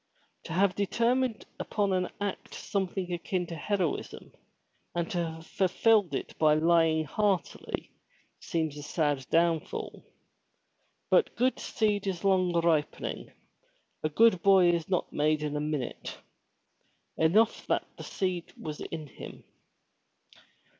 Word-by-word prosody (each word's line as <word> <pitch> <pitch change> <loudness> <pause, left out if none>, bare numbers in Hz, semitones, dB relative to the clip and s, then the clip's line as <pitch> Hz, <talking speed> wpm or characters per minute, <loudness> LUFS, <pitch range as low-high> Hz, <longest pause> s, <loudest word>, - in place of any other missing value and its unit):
To - - -5
have 190 +2 +3
determined 235 +4 0
upon 200 -3 0
an 180 -1 0
act 205 -1 -4
something 190 -3 -2
akin 175 +1 -2
to 170 - -7
heroism, 180 +1 -2 0.6
and 170 0 -1
to 175 -1 0
have 160 0 -6
fulfilled 195 +2 +2
it - - -5
by 155 -1 +5
lying 160 0 +3
heartily, 195 +4 -1 0.5
seems 160 -3 -2
a - - -6
sad 145 -2 0
downfall. 165 -1 0 1.1
But - - +3
good 255 +2 +1
seed 210 -3 0
is 185 -2 -3
long 185 -2 +3
ripening, 165 -3 0 0.7
a 155 - 0
good 200 +2 +4
boy 190 -3 +6
is 170 0 -2
not 180 -2 -1
made 150 +1 +1
in 150 -1 -2
a 150 - -1
minute. 150 -5 -4 1.0
Enough 205 +8 +3
that - - +1
the - - -9
seed 185 -3 -3
was 155 -1 -6
in 160 -2 -5
him. 145 - -11
175 Hz, 125 wpm, -29 LUFS, 160-200 Hz, 1.1 s, boy